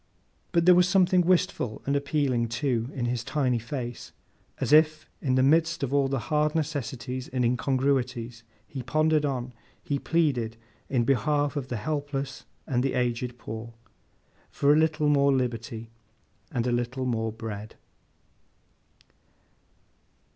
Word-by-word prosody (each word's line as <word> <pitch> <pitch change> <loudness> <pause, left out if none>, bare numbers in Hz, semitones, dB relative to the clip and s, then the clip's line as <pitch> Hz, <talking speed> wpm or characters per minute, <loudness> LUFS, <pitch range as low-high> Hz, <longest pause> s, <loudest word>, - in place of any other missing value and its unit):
But 170 -2 +2
there 180 - +8
was 180 0 +4
something 185 -1 +4
wistful 175 -10 0
and 140 - +1
appealing, 140 -4 +1
too, 120 0 -1
in 125 -3 -2
his 120 0 -1
tiny 130 -3 0
face, 120 -1 -6 0.5
as - - 0
if, 155 0 +4
in 130 -3 +1
the 130 - +4
midst 160 +3 +3
of 135 0 -2
all 140 -1 +3
the 135 0 -1 0.2
hard 150 +1 +2
necessities 130 -5 -3
and 125 -1 -1
incongruities 125 -1 0 0.3
he 135 - -6
pondered 155 +3 +2
on, 125 -3 -3 0.3
he 140 -1 -1
pleaded, 130 -10 0 0.3
in 125 -3 +2
behalf 145 +3 +1
of 140 -3 -3
the 120 - -3
helpless 140 +2 -3 0.2
and 125 -5 0
the 135 +1 0
aged 125 0 -1
poor, 115 0 -7 0.7
for 145 +1 +3
a - - +4
little 155 -1 +2
more 140 -1 +4
liberty—and 115 -1 -5
a 125 - +1
little 120 +2 -1
more 110 -3 -1
bread. 110 -2 -7
130 Hz, 140 wpm, -27 LUFS, 120-150 Hz, 0.7 s, there